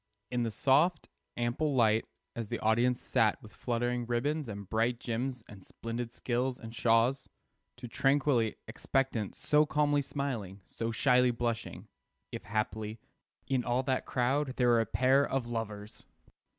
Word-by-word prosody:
In 125 -1 0
the 115 - 0
soft, 150 +9 +2 0.3
ample 120 +5 0
light, 110 -2 +3 0.3
as 115 -2 -4
the 120 - -3
audience 120 +3 +2
sat 110 -2 +1
with 105 - -13
fluttering 120 0 -2
ribbons 140 +5 -1
and 100 -2 -7
bright 115 +3 0
gems 125 +1 -3
and 100 -2 -13
splendid 115 +3 -5
silks 125 +1 -1
and 115 0 -10
shawls, 115 +3 +2 0.5
so 125 - -7
tranquilly 135 -3 +2
expectant, 130 -6 -1
so 150 0 +3
calmly 145 -1 +2
smiling, 120 -9 -4
so 115 - -4
shyly 125 +2 +3
blushing 115 -1 -3 0.4
(if, - - -7
haply, 110 +1 -3 0.5
in 130 -1 0
all 125 +2 0
that 130 -1 -1
crowd 130 +2 0
there 125 -1 +3
were 120 -1 +5
a 115 - -2
pair 130 +5 +3
of 135 -3 -1
lovers!) 110 -3 -6
120 Hz, 150 wpm, -31 LUFS, 115-130 Hz, 0.5 s, were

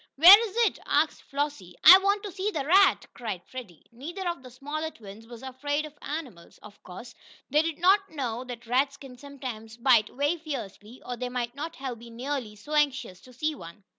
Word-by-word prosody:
"Where 395 +9 +9
is 390 - -15
it?" - - -1
asked - - +1
Flossie. 280 -11 -4
"I 370 +4 +11
want 400 +1 +1
to 410 - -6
see 385 +3 -2
the 300 -9 -3
rat!" 380 +4 +4
cried 210 -7 -6
Freddie. 230 -11 -10
Neither 340 +10 -6
of 340 -5 -3
the 255 - -12
smaller 290 +5 -5
twins 220 -4 -13
was 235 +1 -11
afraid 290 +3 -3
of 305 - -11
animals. 270 - -7
Of 210 -1 -14
course, 230 +7 -11 0.4
they 300 +2 +4
did 325 -1 -3
not 390 +3 +3
know 250 -5 -4
that 240 -2 -9
rats 270 +4 +1
can 270 -3 -12
sometimes 250 -6 -8
bite 235 -3 +4
very 290 +6 -1
fiercely, 245 - -8
or 245 -1 -5
they 250 +1 -4
might 245 -1 -3
not 300 +3 -6
have 255 -3 -6
been 235 0 -13
nearly 250 -4 -4
so 250 +9 -10
anxious 265 -11 0
to 255 - -16
see 305 +5 -2
one. 170 - -12
265 Hz, 200 wpm, -27 LUFS, 235-310 Hz, 0.4 s, I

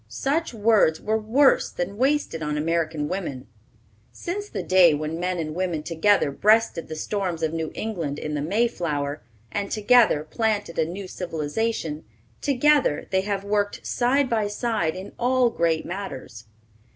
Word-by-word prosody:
Such 275 - -1
words 215 -7 +3
were 220 +1 0
worse 255 +6 +3
than 180 +3 -4
wasted 265 - 0
on 150 -1 -2
American 160 -1 -1
women. 150 -8 -4 0.7
Since 410 +4 -5
the - - -4
day 180 -4 +5
when 155 +2 -4
men 180 +1 -1
and 155 -2 -3
women 175 -3 -2
together 165 0 +2
breasted 210 +3 +2
the 155 - -6
storms 180 -1 -3
of 160 0 0
New 160 -1 -3
England 170 -10 -3
in 150 - -4
the 145 - -1
Mayflower, 155 -6 -1 0.3
and 200 -1 -2
together 215 -7 +4
planted 210 -3 -2
a 160 - +3
new 185 +4 -6
civilization, 165 -1 -3 0.4
together 285 - +2
they 190 0 +2
have 200 0 -2
worked 205 0 -1
side 260 +3 +2
by 220 -4 0
side 205 -6 -1
in 190 +2 -8
all 250 0 +3
great 165 -4 0
matters. 135 - -7
185 Hz, 150 wpm, -24 LUFS, 160-225 Hz, 0.7 s, day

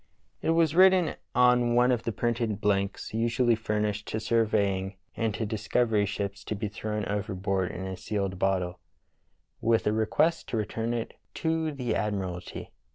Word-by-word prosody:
It - - -1
was 165 -2 +3
written 185 -2 +5 0.2
on 125 -1 +4
one 125 +1 +5
of 120 -2 0
the 115 - 0
printed 115 -1 -1
blanks 100 -1 -1
usually 120 +2 +2
furnished 105 -1 -1
to 110 - -2
surveying 105 -4 +1 0.2
and 115 -1 0
to 115 - -2
discovery 110 0 +1
ships 100 0 -4
to 110 - -3
be 105 +1 -3
thrown 105 0 -3
overboard 95 -2 -1
in 95 +2 -5
a 95 0 -4
sealed 95 -1 -3
bottle, 90 -2 0 0.8
with 115 0 +2
a 105 - +2
request 150 +10 +1
to 115 - -1
return 115 +2 -2
it 115 - -4 0.2
to 160 -1 0
the 130 -4 -2
admiralty. 95 -4 -3
110 Hz, 160 wpm, -28 LUFS, 100-120 Hz, 0.8 s, written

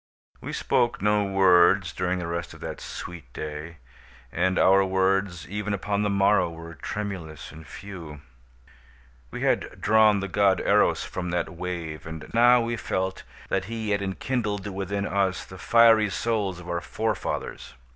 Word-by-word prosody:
We - - -6
spoke 120 0 +1
no 105 0 +3
words 95 -2 +4
during 90 0 -1
the 90 - -4
rest 85 0 -4
of - - -14
that - - -6
sweet 85 -8 -8
day, 75 +2 -6 0.5
and 95 +2 +1
our 95 +1 +5
words 95 -3 0
even 105 +1 -2
upon 100 +1 -1
the 105 - +1
morrow 100 -2 +3
were 85 0 -9
tremulous 85 -1 -6
and 80 0 -12
few. 85 -6 -9 1.1
We - - -7
had - - 0
drawn 110 -1 +4
the 100 - -3
God 100 -1 +3
Eros - - +3
from 90 -1 -5
that 85 0 -1
wave, 85 -4 -5
and 80 -1 -8
now 120 +1 +6
we 115 0 -2
felt 95 -2 -2 0.3
that 95 -1 0
he 110 0 -4
had 100 0 +1
enkindled 105 +1 -2
within 100 0 -3
us 95 -2 0
the 95 - -12
fiery 115 0 +5
souls 100 -3 -1
of 85 - -11
our 85 -1 -2
forefathers. 110 +3 -3
95 Hz, 155 wpm, -26 LUFS, 85-105 Hz, 1.1 s, now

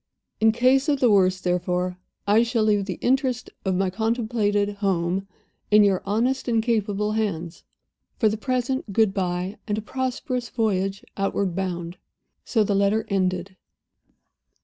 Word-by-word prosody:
In 220 0 +5
case 260 +5 +3
of 285 -2 +2
the 245 -4 +4
worst, 185 -2 +3
therefore, 180 0 -1 0.3
I 210 +3 +4
shall 230 -1 +1
leave 205 -2 +2
the 185 -3 -4
interests 255 -2 0
of 190 -2 0
my 190 0 0
contemplated 215 -2 0
Home 190 -1 0 0.4
in 210 0 +6
your 195 -2 +2
honest 245 +7 0
and 230 -2 +2
capable 210 -3 0
hands. 175 -6 -3 0.5
For 225 - +3
the 215 - +1
present 255 -1 -2
good 215 -1 +3
by, 180 0 -2
and 210 -1 -1
a - - -2
prosperous 255 0 -3
voyage 195 -4 -1
outward 195 -2 -1
bound." 175 -2 -3 0.5
So 225 -3 +1
the 205 - 0
letter 200 +2 +2
ended. 185 -1 -1
205 Hz, 150 wpm, -24 LUFS, 190-230 Hz, 0.5 s, in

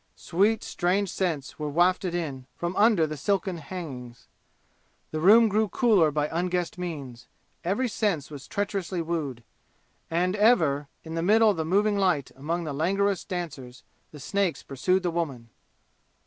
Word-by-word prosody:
Sweet 205 +6 +1
strange 185 +2 0
scents 160 -8 -3
were 150 -1 -2
wafted 175 +3 +2
in 140 -7 -4
from 175 +1 -3
under 210 -6 +4
the 155 0 -5
silken 190 +4 -1
hangings. 135 -9 -8 0.8
The 155 - -2
room 220 +7 +7
grew 215 +1 +1
cooler 205 -8 +4
by 150 0 0
unguessed 180 +1 -1
means. 140 -9 -6 0.4
Every 200 +9 0
sense 195 - -1
was 140 -3 -9
treacherously 195 -3 -2
wooed. 150 -8 -3 0.7
And 180 +3 +1
ever, 160 - +3 0.2
in 160 - -8
the 165 - -1
middle 215 +4 +5
of 195 - -4
the 160 - -1
moving 200 +4 +2
light 180 -9 +1
among 165 +6 -3
the 155 -3 -4
languorous 195 +5 +1
dancers, 145 -9 -6 0.3
the 150 - -11
snakes 195 +4 -1
pursued 185 +8 0
the 175 - 0
woman! 135 -9 -4
175 Hz, 150 wpm, -26 LUFS, 150-195 Hz, 0.8 s, room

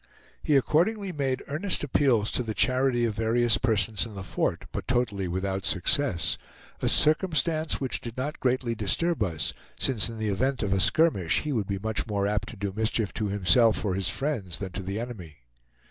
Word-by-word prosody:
He 150 - +1
accordingly 190 - +1
made 135 -5 -2
earnest 175 +6 0
appeals 125 -6 +2
to - - 0
the 110 -3 -4
charity 130 -2 +2
of 115 - -1
various 115 0 +2
persons 110 -3 +2
in 110 -3 -7
the 100 - -6
fort, - - -2
but - - -5
totally 110 -7 0
without 95 +2 -2
success, 95 +2 +1 0.4
a - - +1
circumstance 155 0 +2
which 130 -2 -1
did 115 0 -8
not 145 +4 -3
greatly 125 -2 0
disturb 130 - 0
us, 85 -7 -1 0.2
since 120 -5 0
in 115 - -7
the 110 -1 -2
event 130 +5 0
of 100 -2 0
a 95 - +1
skirmish 110 - +3
he 150 - -3
would 110 -7 -1
be 100 - -2
much 110 +3 -2
more 100 -2 -1
apt 105 -1 -1
to 120 - -9
do 100 0 -3
mischief 110 -1 0
to 110 - -2
himself 105 +4 +3
or 95 - 0
his 95 -1 -1
friends 100 - -2
than 95 -2 -6
to 95 - -5
the 95 +3 -4
enemy. 90 - -8
115 Hz, 190 wpm, -27 LUFS, 100-135 Hz, 0.4 s, skirmish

